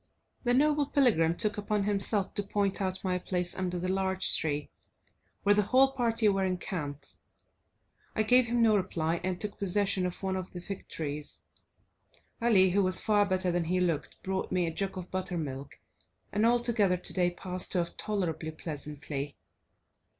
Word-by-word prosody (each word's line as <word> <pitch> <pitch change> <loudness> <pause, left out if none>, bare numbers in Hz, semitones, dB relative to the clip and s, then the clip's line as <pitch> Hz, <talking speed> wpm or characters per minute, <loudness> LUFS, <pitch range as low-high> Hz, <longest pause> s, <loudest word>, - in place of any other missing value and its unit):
The 245 -1 +2
noble 295 +1 +3
pilgrim 200 - +3
took 210 -2 0
upon 210 0 0
himself 200 0 +1
to - - -1
point 200 0 -1
out 190 -1 -2
my 180 -1 0
place 180 -1 -2
under 180 -1 -2
the 180 +1 -2
large 190 0 +1
tree, 150 -2 -2 0.7
where 205 - +5
the 210 - +4
whole 260 +6 +4
party 235 -4 +1
were 195 -1 +2
encamped. 165 -6 -3 1.0
I 220 - +3
gave 250 +2 +5
him 235 0 +2
no 220 -2 +5
reply, 170 -4 0
and 185 -1 -1
took 210 -1 -5
possession 195 -1 +1
of 180 - -8
one 190 -1 0
of 185 -1 -5
the 175 - -5
fig 190 +2 -7
trees. 150 -1 -5 1.0
Ali, 195 -6 +5
who 200 +2 +3
was 185 -1 +1
far 205 -2 +3
better 185 -1 +1
than 175 -1 0
he 180 +3 +1
looked, 170 -5 -1
brought 190 0 -2
me 180 -1 +2
a 165 - -3
jug 195 +2 -3
of 180 -1 -7
buttermilk, 155 -7 -4 0.5
and 210 +2 +3
altogether 235 -6 +3
today 180 0 0
passed 180 +1 -5
off 170 -1 0
tolerably 170 -7 -2
pleasantly. 150 -2 -5
190 Hz, 165 wpm, -30 LUFS, 175-205 Hz, 1.0 s, where